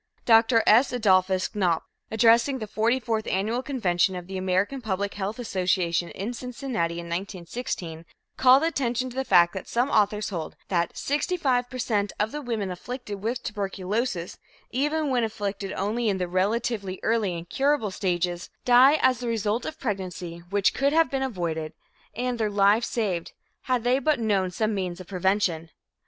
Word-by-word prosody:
Dr. 225 0 +5
S. 235 +5 +5
Adolphus 190 -5 +2
Knopf, 180 -6 +1 0.3
addressing 230 +4 +4
the 220 - -5
forty 225 +4 +1
fourth 225 -3 -2
annual 215 +6 0
convention 190 -9 +1
of 180 -1 -6
the 190 +1 -8
American 190 +8 0
Public 200 -2 -2
Health 205 +2 -4
Association, 180 -6 0
in 215 +5 -5
Cincinnati 245 -8 -3
in 170 0 -6
1916, 170 -1 -5 0.3
called 260 +3 +6
attention 255 -6 -1
to - - -12
the 265 - 0
fact 175 -7 +5
that 190 - -6
some 245 +4 0
authors 210 0 +2
hold 170 -6 -5
that 170 -2 0
"65 275 -5 0
per 255 - -7
cent 205 -5 -1
of 215 +1 0
the 295 - -5
women 225 -7 -3
afflicted 210 +1 -6
with 235 +4 -2
tuberculosis, 200 -1 -3 0.3
even 295 +3 0
when 245 -2 +2
afflicted 205 -3 -3
only 220 +4 -1
in 195 - 0
the 180 -1 -2
relatively 200 +1 -1
early 220 -5 +1
and 170 +1 -8
curable 275 -6 +1
stages, 175 -2 -2 0.2
die 255 +4 +7
as 255 -2 +4
the 245 - -4
result 225 0 -1
of 315 - -7
pregnancy 185 -6 -4
which 200 0 +2
could 280 +1 +1
have 325 0 +3
been 270 -1 -1
avoided 170 -10 -3 0.4
and 245 +1 -2
their 215 -1 +1
lives 205 +3 +3
saved 190 -8 -2 0.3
had 250 -3 0
they 250 +2 +3
but 295 0 +1
known 200 -5 +1
some 215 +4 -1
means 185 -3 -3
of 185 - -9
prevention." 185 -3 0
210 Hz, 170 wpm, -26 LUFS, 185-245 Hz, 0.4 s, die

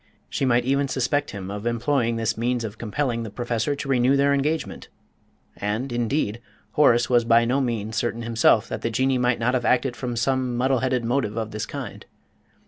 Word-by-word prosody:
She - - -1
might 120 -1 +2
even 140 +1 +1
suspect 140 +3 0
him 95 -1 -6
of 105 +3 -4
employing 120 0 0
this 115 0 -1
means 120 +1 -1
of 110 0 -6
compelling 120 +1 -2
the 115 - -5
Professor 120 +4 -2
to 140 - -6
renew 130 +1 +3
their 140 0 +3
engagement; 150 +3 -2 0.7
and, 110 +6 -3
indeed, 120 -1 -1 0.3
Horace 120 -5 +4
was 120 -1 +3
by 115 0 +4
no 130 +4 +1
means 115 -3 -2
certain 120 -1 -1
himself 115 -2 +3
that - - -5
the 115 - -1
Jinnee 130 +3 +1
might 125 -1 +2
not 120 +2 0
have 125 -2 0
acted 125 0 +2
from 120 -2 -4
some 125 0 0
muddle 130 +1 +2
headed 130 -2 0
motive 115 -3 -1
of 110 -1 -3
this 105 0 -4
kind. - - -7
120 Hz, 195 wpm, -24 LUFS, 115-130 Hz, 0.7 s, Horace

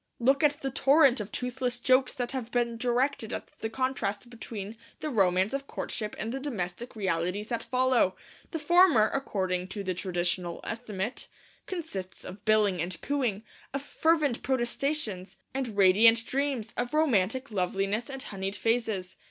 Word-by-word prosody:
Look 270 +4 +3
at 290 0 +3
the 270 - -1
torrent 275 -1 +5
of 210 0 -5
toothless 250 0 -2
jokes 255 +1 +3
that 245 -1 -2
have 255 -4 -4
been 240 -1 0
directed 245 0 0
at - - -6
the 220 - -2
contrast 240 -3 -2
between 220 -3 -7 0.2
the 305 - -3
romance 190 -1 +3
of 275 0 -3
courtship 215 -2 -4
and 225 - -3
the 270 - -2
domestic 235 -4 -4
realities 190 +1 -1
that 235 - -1
follow. 255 -7 +2 0.3
The 325 - -3
former, 315 - +5
according 185 -9 -1
to 200 +2 -5
the 185 -1 -1
traditional 175 -1 -2
estimate, 220 -1 -4 0.4
consists 295 - -6
of 185 +2 -9
billing 210 -5 +3
and 170 0 -3
cooing, 245 -8 0 0.3
of 275 - -2
fervent 305 -4 +1
protestations 240 - -2 0.2
and 255 -6 -3
radiant 225 +4 +6
dreams, 265 -5 -1
of 245 +4 -2
romantic 260 -3 +2
loveliness 195 +4 -1
and 270 -1 -5
honeyed 195 0 -4
phrases. 220 -3 -1
230 Hz, 150 wpm, -29 LUFS, 195-265 Hz, 0.4 s, radiant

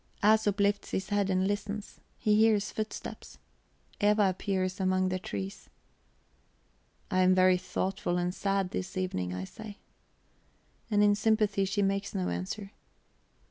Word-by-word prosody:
Æsop 210 -1 +4
lifts 205 0 +1
his 190 +1 -3
head 205 -1 +1
and 185 0 +2
listens; 205 +1 -4 0.2
he 210 -1 +2
hears 215 -1 +3
footsteps; 215 0 -6 0.6
Eva 205 -1 +4
appears 185 0 -2
among 185 0 +2
the 185 0 -1
trees. 195 -1 -6 1.4
"I 185 - +2
am 185 0 +5
very 185 0 +5
thoughtful 185 -1 -2
and 180 0 -1
sad 195 -1 -1
this 185 -1 -4
evening," 135 - -2
I 90 0 -4
say. 210 - -9 1.1
And 205 -1 +3
in 205 0 +5
sympathy 210 -2 +2
she 200 +1 0
makes 195 +1 -1
no 90 -1 -1
answer. 95 - -4
195 Hz, 140 wpm, -30 LUFS, 185-205 Hz, 1.4 s, am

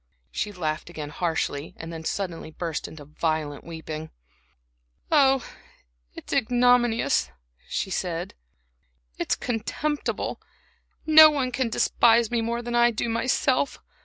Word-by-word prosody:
She 210 - -2
laughed 160 -4 -3
again 150 -3 -7
harshly 160 -3 -2
and 165 +1 -7
then 160 0 -7
suddenly 170 -2 -4
burst 165 0 -4
into 150 -2 -11
violent 155 -1 -2
weeping. 160 -1 -7 1.0
"Oh, 270 -4 +4 0.7
it's - - -7
ignominious," 240 - +3 0.4
she 190 - -2
said, 175 -2 -3 0.9
"it's - - 0
contemptible. 270 +6 -3 0.6
No 315 0 +9
one 270 -4 -1
can 255 -1 -1
despise 230 0 +3
me 235 -1 +1
more 235 +1 -2
than 240 0 -4
I 240 0 +5
do 235 0 -2
myself. 255 +4 +1
220 Hz, 120 wpm, -25 LUFS, 160-245 Hz, 1.0 s, No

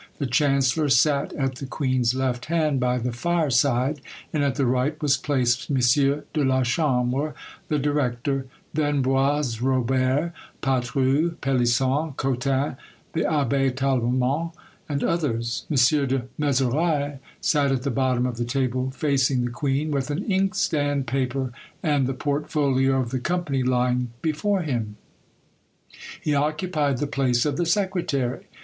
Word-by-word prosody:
The 140 - -2
chancellor 140 +2 +2
sat 140 +2 +3
at 135 -2 -2
the 135 - -6
queen's 130 -3 0
left 130 -2 -1
hand 155 -4 +1
by 125 0 +1
the 125 0 -2
fire 160 +4 0
side; 130 +3 +2 0.3
and 150 -2 +1
at 140 -2 +1
the 140 - +1
right 130 +5 0
was 145 -2 +3
placed 125 -3 0
M. 140 - +1 0.6
de 150 - +1
la 130 -1 +2
Chambre, 130 +2 0 0.3
the 150 - 0
director; 135 -2 -1 0.3
then 145 -2 +1
Boisrobert, 130 +1 +1 0.3
Patru, 135 +5 +1
Pelisson, 135 +3 +1
Cotin, 135 +1 0 0.4
the 165 - 0
Abbé 140 -2 +1
Tallemant, 130 +4 0 0.4
and 140 -1 -1
others. 120 -9 -1
M. 150 - 0 0.3
de 130 -1 0
Mezeray 145 +1 0 0.2
sat 145 -3 +2
at 130 -2 -1
the 140 - -1
bottom 130 -1 +1
of 125 -2 -3
the 120 - -1
table 130 +1 -1
facing 130 -2 +1
the 120 - -3
queen, 140 +4 -1
with 140 -1 -1
an 150 +7 -2
inkstand, 185 -8 0
paper, 130 0 -1 0.3
and 145 -4 +2
the 135 - -2
portfolio 140 -2 +1
of 120 -2 -2
the 130 - -1
company 155 -2 -1
lying 125 -1 +1
before 180 +5 0
him: 115 -8 -3 1.2
he 150 - -1
occupied 150 -1 0
the 145 - -1
place 130 -4 +1
of 145 -2 0
the 175 - 0
secretary. 170 -9 -1
135 Hz, 140 wpm, -24 LUFS, 125-150 Hz, 1.2 s, sat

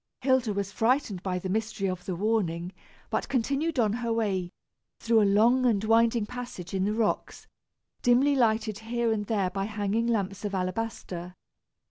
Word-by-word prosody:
Hilda 260 -3 +2
was 200 -1 -2
frightened 225 -3 +1
by 185 -1 -2
the 180 - -4
mystery 215 0 -1
of 185 -1 -4
the 185 - -3
warning, 180 -3 -1 0.4
but - - -1
continued 275 +5 0
on 215 -4 +2
her 235 0 -2
way, 200 -6 0 0.5
through 230 -1 +3
a 205 - +4
long 235 +6 +4
and 220 -5 +2
winding 225 0 +3
passage 240 -6 -7
in 190 0 +1
the 210 - 0
rocks, 225 -2 -1 0.6
dimly 255 +4 +4
lighted 220 -4 +1
here 230 +1 -1
and 210 -2 -1
there 200 -5 0
by 195 0 -2
hanging 210 +2 -1
lamps 200 -4 -1
of 205 -1 -2
alabaster. 185 -2 -4
215 Hz, 165 wpm, -28 LUFS, 195-235 Hz, 0.6 s, a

